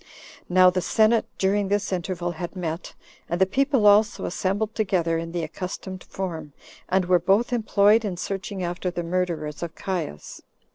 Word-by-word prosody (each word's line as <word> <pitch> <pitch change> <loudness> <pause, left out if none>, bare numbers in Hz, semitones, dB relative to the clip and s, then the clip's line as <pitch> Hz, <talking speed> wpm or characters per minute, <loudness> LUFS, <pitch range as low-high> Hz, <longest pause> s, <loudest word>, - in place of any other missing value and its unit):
Now 185 0 +6
the 185 0 -1
senate, 220 +4 +3
during 200 +1 +1
this 200 0 0
interval, 175 -1 -2
had 175 +3 -6
met, 170 -1 -5 0.3
and 175 - -1
the 190 - +5
people 265 +2 +1
also 210 +1 +4
assembled 200 +4 -1
together 175 -7 0
in 165 0 -5
the 170 -1 -2
accustomed 185 +3 -6
form, 165 -6 -5 0.4
and 190 0 +2
were 180 0 +4
both 200 +8 +2
employed 215 -1 +4
in 190 -4 -3
searching 195 +1 -4
after 175 +1 -2
the 175 -1 -4
murderers 170 -4 -2
of 170 -1 -5
Caius. 170 - -5
185 Hz, 160 wpm, -24 LUFS, 175-205 Hz, 0.4 s, Now